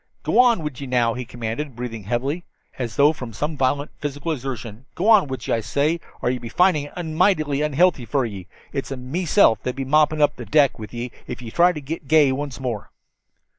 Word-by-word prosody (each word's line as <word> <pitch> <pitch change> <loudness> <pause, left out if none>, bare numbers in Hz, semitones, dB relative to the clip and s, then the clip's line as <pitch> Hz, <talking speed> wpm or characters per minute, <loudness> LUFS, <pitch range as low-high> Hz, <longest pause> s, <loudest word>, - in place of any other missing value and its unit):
"G'wan 240 -8 +4
with 145 -3 -5
ye, 140 - -5
now," 120 -2 +2
he 125 +1 -5
commanded, 120 +3 -5
breathing 115 -4 -6
heavily, 135 - -2 0.4
as 120 -4 -3
though 145 +2 +5
from 125 -7 -8
some 150 +8 -3
violent 140 +2 0
physical 145 +2 -3
exertion. 125 -4 -6
"G'wan 200 -1 +5
with 130 -4 -6
ye, - - +1
I 115 - +2
say, 140 +9 0 0.2
or 125 - +2
ye'll 125 -1 -3
be 115 - -6
findin' 155 -1 +2
it 175 - -3
mighty 155 -3 +1
unhealthy 150 -2 +2
fer 135 +1 0
ye. 100 -5 -7 0.3
It's 135 - -3
meself 135 - +2
that'll 125 +1 -4
be 135 - -2
moppin' 155 +2 +3
up 145 - +3
the - - -7
deck 145 -5 +3
with 110 - -8
ye 120 0 -5 0.2
if 125 - -6
ye 115 - -7
try 175 +6 +5
to 155 -4 -6
get 150 +1 -6
gay 150 -3 +5
once 140 -1 -4
more." 120 -6 -4
135 Hz, 210 wpm, -22 LUFS, 120-155 Hz, 0.4 s, though